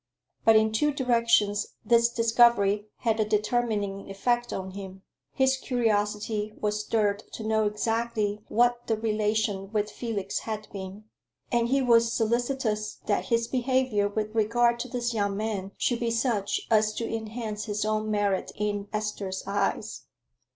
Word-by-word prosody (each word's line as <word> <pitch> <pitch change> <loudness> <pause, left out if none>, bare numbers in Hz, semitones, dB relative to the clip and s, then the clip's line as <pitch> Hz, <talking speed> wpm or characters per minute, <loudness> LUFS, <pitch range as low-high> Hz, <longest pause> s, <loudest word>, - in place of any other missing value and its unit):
But 225 - +7
in 220 0 +4
two 295 +8 +2
directions 235 -6 +2
this 235 0 +4
discovery 230 -3 +3
had 225 -2 +1
a - - +4
determining 210 -2 -1
effect 240 +5 0
on 190 0 -4
him; 190 0 -9 0.3
his 265 0 +2
curiosity 215 -3 -1
was 210 0 -1
stirred 210 -1 0
to 225 - -6
know 220 -1 +2
exactly 215 -1 -1
what 240 +1 +2
the 225 - +1
relation 210 -2 -1
with 210 -1 -1
Felix 205 -5 -3
had 215 -1 -5
been, 195 +1 -7 0.5
and 235 -1 +2
he 270 +2 +2
was 230 -2 +4
solicitous 230 -2 0
that 205 - 0
his 230 0 +1
behavior 255 -5 +1
with 215 +1 -3
regard 235 +2 +2
to 255 - -3
this 240 -1 -2
young 200 -2 0
man 205 -3 -3
should 240 -2 0
be 235 - 0
such 225 -3 0
as 215 -1 +3
to 230 - -2
enhance 220 -1 -4
his 210 -1 -2
own 215 0 0
merit 205 -2 0
in 205 -1 -2
Esther's 210 -3 -3
eyes. 200 0 -2
215 Hz, 150 wpm, -27 LUFS, 205-235 Hz, 0.5 s, But